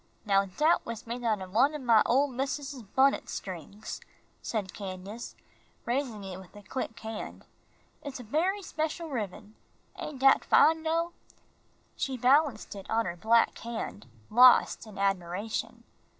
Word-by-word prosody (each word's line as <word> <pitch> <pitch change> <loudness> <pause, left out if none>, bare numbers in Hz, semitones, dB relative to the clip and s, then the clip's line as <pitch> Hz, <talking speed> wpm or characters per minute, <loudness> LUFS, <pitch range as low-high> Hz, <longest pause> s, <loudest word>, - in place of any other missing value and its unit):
"Now 200 -1 +3
dat 300 - +2
was 230 -1 -7
made 240 +1 -5
out 215 -4 0
o' - - -8
one 255 +10 +3
ob 300 - -5
my 230 -4 +5
ole 270 +4 +4
missus's 275 0 -4
bunnet 265 +6 +2
strings," 190 +3 -7 0.4
said 205 -5 -3
Candace, 195 +3 -7 0.5
raising 240 -4 -2
it 190 -1 -7
with 190 +2 -15
a 205 - -12
quick 230 +2 -5
hand. 220 -1 -7 0.6
"It's 280 -3 -7
a - - -7
bery 355 - 0
special 320 0 -3
ribbin. 210 -3 -5 0.5
Ain' 300 - -5
dat 270 +1 +5
fine, 320 +2 +5
dough?" 330 +2 0 0.8
She 265 -1 -2
balanced 260 -1 +3
it 195 -2 -10
on 225 +1 +1
her 175 - -3
black 225 +6 +3
hand, 225 - -6 0.2
lost 245 -1 +6
in 210 -2 -11
admiration. 195 +1 -2
230 Hz, 150 wpm, -29 LUFS, 200-275 Hz, 0.8 s, lost